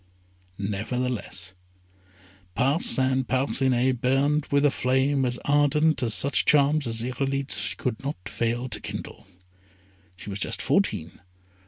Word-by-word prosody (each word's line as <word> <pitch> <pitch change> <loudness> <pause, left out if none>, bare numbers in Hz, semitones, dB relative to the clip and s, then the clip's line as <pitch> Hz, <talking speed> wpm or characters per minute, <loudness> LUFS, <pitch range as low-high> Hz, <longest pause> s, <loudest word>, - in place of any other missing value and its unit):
Nevertheless 105 0 -3 1.0
Parcin 130 -1 +2
Parcinet 130 -1 +1
burned 140 +3 +1
with 140 +1 +2
a 145 - +4
flame 135 +2 +1
as 125 0 -1
ardent 145 +1 +2
as 115 -4 +2
such 140 +4 +4
charms 145 -1 +3
as 115 0 -3
Irolite's 135 +2 -2
could 125 -3 -4
not 140 +2 -3
fail 120 +2 -2
to 110 - -3
kindle. - - -8 0.9
She 100 +2 -9
was 100 - -5
just - - -3
fourteen. 80 +2 -1
130 Hz, 120 wpm, -25 LUFS, 120-140 Hz, 1.0 s, a